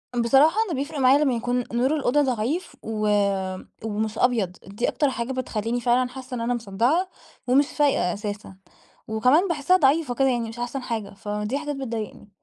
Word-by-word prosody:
بصراحة 270 - +4
أنا 335 - -2
بيفرق 290 +1 -4
معايا 270 +3 +5
لمّا 265 -4 +2
يكون 245 +1 -1
نور 260 +6 +2
الأوضة 290 0 +2
ضعيف، 260 +6 -1
و 215 -1 -2 0.8
ومش 220 0 -2
أبيض. 230 -8 +2 0.2
دي 205 +5 -2
أكتر 290 -3 +1
حاجة 245 0 -3
بتخلّيني 240 -2 -2
فعلًا 245 +1 +2
حاسّة 260 0 -8
إن 235 - -4
أنا 240 +1 0
مصدعة 240 - 0 0.4
ومش 275 +3 +4
فايقة 280 - +1
أساسًا، 205 -2 -6 0.5
وكمان 255 - +3
باحسّها 340 +2 +2
ضعيفة 285 -2 +2
كده 270 +1 +3
يعني 235 -2 -1
مش 235 +2 -9
أحسن 245 +2 -3
حاجة، 225 -5 -4
فدي 210 +5 -3
حاجات 295 0 -4
بتضايقني. 230 -6 -6
245 Hz, 170 wpm, -24 LUFS, 220-275 Hz, 0.8 s, معايا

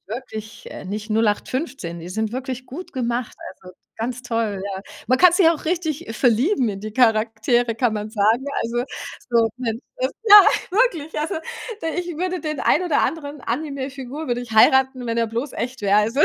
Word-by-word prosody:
wirklich, 220 -1 -7
äh, - - -8
nicht 210 +3 -5
0815, 220 - -1
die 170 - -8
sind 220 +3 -2
wirklich 255 0 -5
gut 330 +9 -8
gemacht, 240 -2 -2 0.2
also 185 -1 -15 0.2
ganz 245 +2 -4
toll, 225 -5 -2
ja. 195 -1 -5 0.2
Man 255 - +3
kann 360 -1 +7
sich 350 -2 +5
auch 330 -2 0
richtig 320 -6 -2
verlieben 250 - +2
in 195 -1 -4
die 215 +1 -6
Charaktere, 225 0 +2
kann 240 -1 +1
man 210 0 -4
sagen. 220 +4 +2 0.2
Also, 240 +2 -1 0.5
so, 230 -1 +4
Mensch 230 -2 -3 0.4
ja, 415 -2 +11 0.3
wirklich. 365 -9 +1
Also, 320 +5 -2 0.5
d - - -2
ich 355 - -7
würde 360 +1 -2
den 305 -1 -3
einen 360 +3 +2
oder 310 -5 +2
anderen 295 -3 -3
Anime-Figur 275 +2 -4
würde 245 -1 -1
ich 245 - -9
heiraten, 260 +3 +4
wenn 230 - -1
er 230 -1 +1
bloß 235 +5 -3
echt 250 +1 -4
wäre. 200 +1 +4
Also, 225 +6 +1
ja. - - +8
245 Hz, 180 wpm, -22 LUFS, 220-290 Hz, 0.5 s, ja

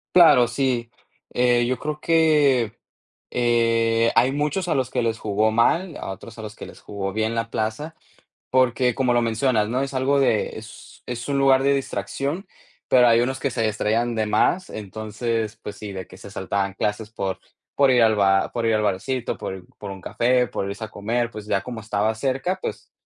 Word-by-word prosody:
Claro, 125 -9 +7
sí. 120 -2 -1 0.4
Eh, 120 -1 +3
yo 130 +1 -1
creo 150 0 -4
que, 150 -8 +3 0.6
eh, 115 -1 +2
hay 125 +3 +4
muchos 150 +5 -1
a - - +1
los 130 -2 0
que 125 - -1
les 115 -1 0
jugó 110 +1 +1
mal, 160 +10 +2
a - - -6
otros 115 +4 -10
a - - -7
los 105 -1 -7
que - - -9
les - - -13
jugó 95 -1 -5
bien 110 +1 0
la 115 0 -2
plaza, 110 +9 -3 0.5
porque 125 -1 +2
como 125 0 +1
lo 120 - +3
mencionas, 115 -1 +1
¿no? 125 +3 0
Es 140 0 -3
algo 135 +2 +2
de 115 -6 +1
es 110 +1 -12
es 125 +2 -5
un 140 - +1
lugar 135 -1 +4
de 140 +1 +4
distracción, 140 - -3 0.4
pero 125 -1 +6
hay 115 0 +5
unos 130 +2 -1
que 140 - -1
se 115 -1 -2
distraían 110 +2 0
de 110 -1 0
más. 180 - +1
Entonces, 110 +2 -4
pues 105 -1 -7
sí, 105 -2 -7
de 95 -2 -6
que 95 - -14
se 100 - -11
saltaban 100 0 -2
clases 105 +2 -2
por 95 -3 -3 0.4
por 140 -1 +4
ir 125 - +4
al 110 -1 +4
bar 95 -1 +3
por 120 -1 -2
ir 115 - +3
al 105 - +1
barcito, 115 +6 -1
por 95 -1 -6
por 100 -2 -7
un 95 - -9
café, 125 +5 +1
por 100 - -3
irse 100 +2 -6
a 110 - -6
comer, 115 +4 -2
pues 105 -1 -8
ya 100 -2 0
como 120 -2 -6
estaba 105 0 0
cerca, 135 +10 -1
pues, - - -6
115 Hz, 205 wpm, -23 LUFS, 110-130 Hz, 0.6 s, Claro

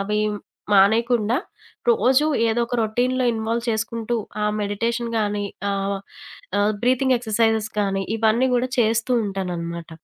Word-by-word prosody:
అవి 210 +2 -1 0.5
మానేయకుండా 225 +3 +3 0.5
రోజు 295 - +3 0.2
ఏదో 235 +2 +1
ఒక 245 - -5
రొటీన్‌లో 250 +4 0
ఇన్వాల్వ్ 230 +2 -2
చేసుకుంటూ 225 +1 -2 0.3
ఆ - - +2 0.2
మెడిటేషన్ 230 +3 -2
గానీ, 205 -1 -1 0.3
ఆహ్, 195 0 -1 0.6
ఆహ్, 210 +1 +2
బ్రీతింగ్ 255 +1 +3
ఎక్సర్సైజెస్ 220 -1 +1
కానీ 195 -1 0
ఇవన్నీ 225 +4 +2
కూడా 250 +1 0
చేస్తూ 230 +2 +2
ఉంటాననమాట. 170 -4 -4
220 Hz, 120 wpm, -22 LUFS, 205-240 Hz, 0.6 s, మానేయకుండా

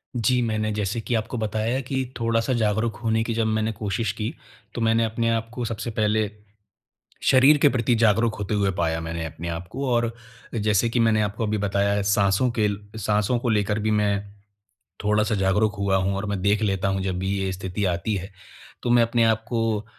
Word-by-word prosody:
जी, 125 +2 +2
मैंने 110 -2 -1
जैसे 105 +1 -2
कि 120 - -2
आपको 110 +3 -2
बताया 110 +3 -1
कि 130 0 -2
थोड़ा-सा 115 +2 +1
जागरूक 110 -1 0
होने 110 0 +2
की 115 - -2
जब 115 0 0
मैंने 110 0 0
कोशिश 105 0 -2
की, 110 +5 -4 0.4
तो 120 - -4
मैंने 115 0 +3
अपने 115 +1 -1
आपको 115 +2 -3
सबसे 115 +1 -4
पहले, 110 -1 +1 0.9
शरीर 135 +3 +6
के 145 0 +5
प्रति 120 -2 +1
जागरूक 115 0 +3
होते 105 +1 -3
हुए 100 -2 +2
पाया, 80 -1 0
मैंने 80 0 -4
अपने 80 +1 -7
आपको 85 +11 -4
और 120 -1 +1 0.4
जैसे 110 +1 +2
कि 120 - 0
मैंने 110 -2 +3
आपको 105 +2 -2
अभी 105 0 0
बताया 100 0 +1
है 100 0 0
साँसों 100 +4 +2
के 105 - +4 0.3
साँसों 105 +3 +1
को 120 - -1
लेकर 105 -1 +1
भी 110 +1 0
मैं 100 -1 +1 0.9
थोड़ा-सा 105 +2 +2
जागरूक 105 +2 +2
हुआ 100 -1 +2
हूँ 95 +1 0
और 100 +2 -3
मैं 100 -2 -2
देख 100 +2 +2
लेता 100 -2 0
हूँ 95 0 -1
जब 95 -1 -2
भी 95 +1 -2
ये 95 -1 -1
स्थिति 95 +2 -4
आती 90 +4 0
है। 95 +1 -5 0.5
तो, 120 - -1
मैं 120 0 +6
अपने 115 0 +2
आप 110 0 +2
को 115 -3 0
अ, 105 - -9
110 Hz, 200 wpm, -24 LUFS, 100-115 Hz, 0.9 s, शरीर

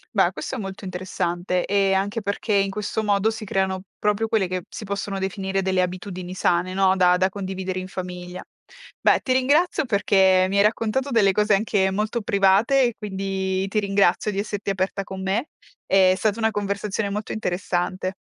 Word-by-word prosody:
Beh - - +4
questo - - -5
è - - -4
molto 195 -2 -6
interessante, 180 -1 -2
ehm, 195 -1 +2
anche 200 +4 -1
perché 205 +2 -2
in 195 -1 +2
questo 210 +2 -3
modo 205 0 +2
si 220 -1 -5
creano 190 -1 -1 0.2
proprio 210 +1 +1
quelle 220 -4 +1
che 185 0 -3
si - - -8
possono 200 -1 -3
definire 190 0 -2
delle 190 -1 +1
abitudini 180 0 -5
sane, 180 0 0
no, 190 0 +3
da 180 -1 +4
da 185 +1 +2
condividere 190 -1 -4
in 185 - -6
famiglia. 180 -1 -7 0.6
Beh, - - +4
ti 255 - 0
ringrazio 290 +5 +2
perché 190 -4 +3
mi 200 - 0
hai 200 - +5
raccontato 230 +5 0
delle 210 -5 +4
cose 210 +2 +2
anche 195 -2 +1
molto 215 +4 -1
private 200 +7 +3
e 240 - 0
quindi 190 -1 -2
ti 215 +2 0
ringrazio 200 0 +2
di 195 - -3
esserti 205 -1 -3
aperta 195 +1 -2
con 190 0 -7
me. 200 +9 -1 0.4
È 190 -1 +4
stata 215 +1 0
una 220 0 +2
conversazione 205 0 -2
molto 210 +1 -4
interessante. 185 -1 -2
195 Hz, 180 wpm, -23 LUFS, 185-210 Hz, 0.6 s, hai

